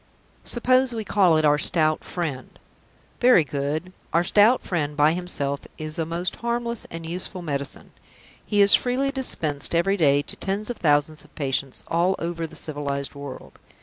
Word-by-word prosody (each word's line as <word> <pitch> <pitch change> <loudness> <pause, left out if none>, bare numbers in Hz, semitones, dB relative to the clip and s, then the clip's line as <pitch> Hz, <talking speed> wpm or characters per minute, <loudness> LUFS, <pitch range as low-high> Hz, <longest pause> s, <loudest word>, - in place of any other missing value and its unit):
Suppose 255 +1 +3
we 225 -1 -3
call 185 -6 +4
it 155 - +2
'our 150 0 +4
Stout 155 -1 +3
Friend'? 155 -8 -5 0.6
Very 245 -9 +6
good. 150 +5 -3 0.2
Our 170 +1 +3
Stout 210 +7 +4
Friend, 150 -5 -2
by 150 +2 +4
himself, 145 -6 -2 0.2
is 155 +1 -5
a 160 - -1
most 170 +2 -3
harmless 235 -1 -3
and 165 0 -7
useful 180 +2 -4
medicine. 140 -3 -3 0.5
He 205 -1 +1
is 200 - +4
freely 260 +2 +2
dispensed 160 - 0
every 195 +4 +2
day 145 -4 +3
to - - -6
tens 205 +4 -3
of 240 - -7
thousands 150 0 +1
of - - -22
patients 135 -2 -2
all 175 +3 +1
over 165 -1 -3
the - - -15
civilized 140 -2 -3
world. 140 -2 -10
165 Hz, 165 wpm, -24 LUFS, 145-200 Hz, 0.6 s, Very